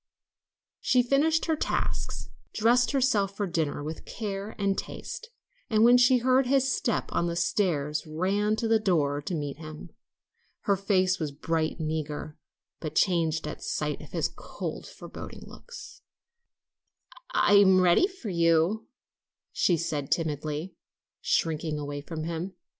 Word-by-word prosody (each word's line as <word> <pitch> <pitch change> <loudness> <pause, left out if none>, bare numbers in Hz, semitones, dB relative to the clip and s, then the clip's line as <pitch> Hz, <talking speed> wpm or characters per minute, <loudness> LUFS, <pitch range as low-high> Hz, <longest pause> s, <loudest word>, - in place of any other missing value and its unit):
She 250 -1 +3
finished 300 +6 +2
her 320 - +1
tasks, - - -2 0.3
dressed 240 +3 +4
herself 215 -8 +1
for 205 - 0
dinner 160 -5 -2
with 155 +2 -6
care 205 -1 -5
and 200 -1 +1
taste, 465 - -6 0.4
and 215 -2 +4
when 245 +1 +7
she 250 +1 +6
heard 255 +1 +3
his 270 0 +3
step 235 - -1
on 170 - +1
the 170 - -2
stairs 155 -4 0
ran 195 +7 0
to 225 +1 -1
the 225 0 +4
door 150 -8 +1
to 170 +4 -3
meet 145 -3 -4
him. 155 -1 -9 0.7
Her 200 - +2
face 190 -1 +1
was 155 -3 -2
bright 160 +2 -1
and 155 -2 -2
eager, 150 -1 -4 0.4
but 155 - -5
changed 165 -4 +2
at - - -6
sight - - -2
of - - -11
his - - 0
cold, - - -7
forbidding - - -10
looks. 485 - -12 1.3
"I - - +4
am 190 -2 +6
ready 185 - +5
for 370 - -8
you," 170 +5 +2 0.6
she 175 - +2
said 150 -4 -3
timidly, 155 +1 -2 0.5
shrinking 160 -1 0
away 145 -1 -4
from 155 +1 -6
him. 170 +3 -4
180 Hz, 145 wpm, -28 LUFS, 155-220 Hz, 1.3 s, when